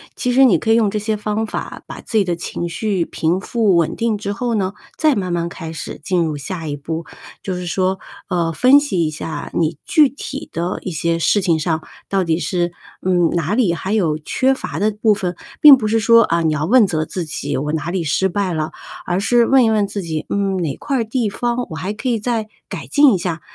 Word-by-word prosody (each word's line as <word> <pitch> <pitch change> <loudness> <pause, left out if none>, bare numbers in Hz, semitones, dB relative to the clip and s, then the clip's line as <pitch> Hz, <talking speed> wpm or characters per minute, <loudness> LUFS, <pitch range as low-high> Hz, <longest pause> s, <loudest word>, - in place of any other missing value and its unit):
其 250 - -1
实 265 +2 +5
你 195 -10 +5
可 225 - -1
以 - - +6
用 220 -3 +3
这 210 - -1
些 215 +1 -1
方 210 +1 -2
法 - - -6
把 - - -8
自 225 - -2
己 205 - +4
的 175 -2 -1
情 170 0 -4
绪 195 0 -1
平 170 +4 -1
复 215 -3 +1
稳 170 -2 +1
定 230 -2 0
之 200 0 -4
后 240 +3 -2
呢， 195 -1 -1 0.2
再 310 -3 +3
慢 185 -3 -2
慢 170 0 -1
开 165 -2 -7
始 160 - -7
进 180 -1 +1
入 155 -3 -2
下 165 +2 -5
一 145 - -3
步， 160 +3 -5 0.4
就 190 - -3
是 180 - -5
说， 190 +1 0 0.3
呃， 170 -2 0
分 255 - +6
析 195 - -1
一 - - 0
下 155 -1 -6
你 160 -2 0
具 305 -2 +5
体 275 0 -7
的 175 +2 -2
一 185 - -4
些 165 +1 0
事 205 +5 +2
情 170 -4 +1
上， 160 0 -1 0.3
到 195 -1 +1
底 165 -2 +1
是， 175 -1 -1 0.3
嗯， 175 -2 +2
哪 170 +2 -1
里 220 -8 +2
还 190 +4 -3
有 165 -8 +1
缺 260 +12 +1
乏 265 - -5
的 215 +2 +2
部 210 +1 +2
分， 180 -3 -3 0.3
并 290 -3 +10
不 220 -4 -2
是 225 +1 +2
说 230 +1 +6
啊， 170 -4 +1
你 160 -1 +2
要 150 0 -1
问 235 +5 +5
责 155 -3 -1
自 180 0 -4
己 145 -2 -3
我 150 +3 -2
哪 160 +1 -2
里 180 -2 -1
失 165 +5 +1
败 190 -1 -1
了， 155 0 -2 0.3
而 180 +1 0
是 235 +3 +3
问 265 0 +5
一 - - +3
问 215 -2 +2
自 200 0 -4
己， 160 -3 -4
嗯， 195 -1 0
哪 160 -6 -2
块 275 -2 -2
儿 230 - +1
地 225 -1 -1
方 240 +3 -2
我 160 - -6
还 190 +5 -3
可 240 +4 -3
以 230 -2 +1
再 220 -1 -2 0.2
改 - - -7
进 285 -4 +5
一 190 - 0
下。 170 -2 -3
190 Hz, 260 characters per minute, -19 LUFS, 165-220 Hz, 0.4 s, 并